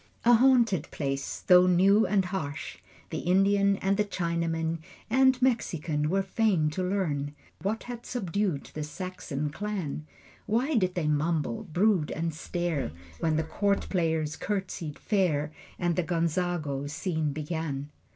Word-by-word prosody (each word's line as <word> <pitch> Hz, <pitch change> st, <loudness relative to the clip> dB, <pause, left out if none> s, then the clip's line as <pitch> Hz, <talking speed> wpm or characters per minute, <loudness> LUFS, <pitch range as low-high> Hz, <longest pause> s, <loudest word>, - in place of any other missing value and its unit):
A 240 Hz, -, +7 dB
haunted 235 Hz, -, +4 dB
place, 135 Hz, -2 st, -3 dB
though 180 Hz, 0 st, +6 dB
new 195 Hz, +4 st, +5 dB
and 195 Hz, -2 st, +2 dB
harsh! 170 Hz, -6 st, -4 dB, 0.3 s
The -, -, -2 dB
Indian 195 Hz, +2 st, +3 dB
and 195 Hz, +1 st, +2 dB
the 210 Hz, -, +3 dB
Chinaman 165 Hz, -3 st, -1 dB, 0.3 s
And 260 Hz, +1 st, +5 dB
Mexican 165 Hz, -, +1 dB
were 195 Hz, +2 st, +2 dB
fain 190 Hz, -6 st, +1 dB
to 170 Hz, -, -3 dB
learn 155 Hz, -7 st, -1 dB, 0.3 s
What 215 Hz, +3 st, -2 dB
had 240 Hz, -1 st, -7 dB
subdued 200 Hz, -, -2 dB
the 155 Hz, -, -4 dB
Saxon 150 Hz, -2 st, -4 dB
clan. 180 Hz, -5 st, -4 dB, 0.4 s
Why 250 Hz, +8 st, +1 dB
did 185 Hz, -7 st, +1 dB
they 170 Hz, -4 st, 0 dB
mumble, 160 Hz, +8 st, 0 dB
brood, 185 Hz, -1 st, +2 dB
and 165 Hz, +1 st, -2 dB
stare 165 Hz, -, -2 dB, 0.3 s
When 160 Hz, -2 st, +1 dB
the 160 Hz, -, +1 dB
court 200 Hz, +5 st, 0 dB
players 160 Hz, -4 st, 0 dB
curtsied 180 Hz, -6 st, -3 dB
fair 160 Hz, -8 st, +1 dB, 0.3 s
And 175 Hz, -1 st, 0 dB
the 180 Hz, -, +2 dB
Gonzago 165 Hz, -4 st, -1 dB
scene 160 Hz, -2 st, -1 dB
began? 150 Hz, -1 st, -4 dB
175 Hz, 140 wpm, -28 LUFS, 155-200 Hz, 0.4 s, A